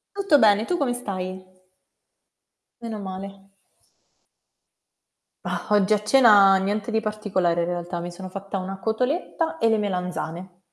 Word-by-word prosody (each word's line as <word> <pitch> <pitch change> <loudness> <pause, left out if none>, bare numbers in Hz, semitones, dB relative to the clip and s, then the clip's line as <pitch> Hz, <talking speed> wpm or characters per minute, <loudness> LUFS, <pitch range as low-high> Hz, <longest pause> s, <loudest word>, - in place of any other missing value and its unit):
Tutto 390 -7 +3
bene. 215 -3 +4
Tu 355 - -1
come 275 -6 0
stai? 185 -6 -5 1.4
Meno 225 -2 -6
male. 195 0 -8 2.0
Ah, - - -4
oggi 205 -1 +3
a 210 -1 +3
cena 210 -5 +6
niente 200 +3 -1
di 220 -1 0
particolare 190 -6 -1
in - - -3
realtà, 175 0 -4
mi 175 +1 -6
sono 185 +1 -8
fatta 195 +1 -6
una 190 +1 -6
cotoletta 285 - -2
e 230 - +2
le 225 -1 +3
melanzane. 180 -2 -4
200 Hz, 135 wpm, -24 LUFS, 185-220 Hz, 2.0 s, cena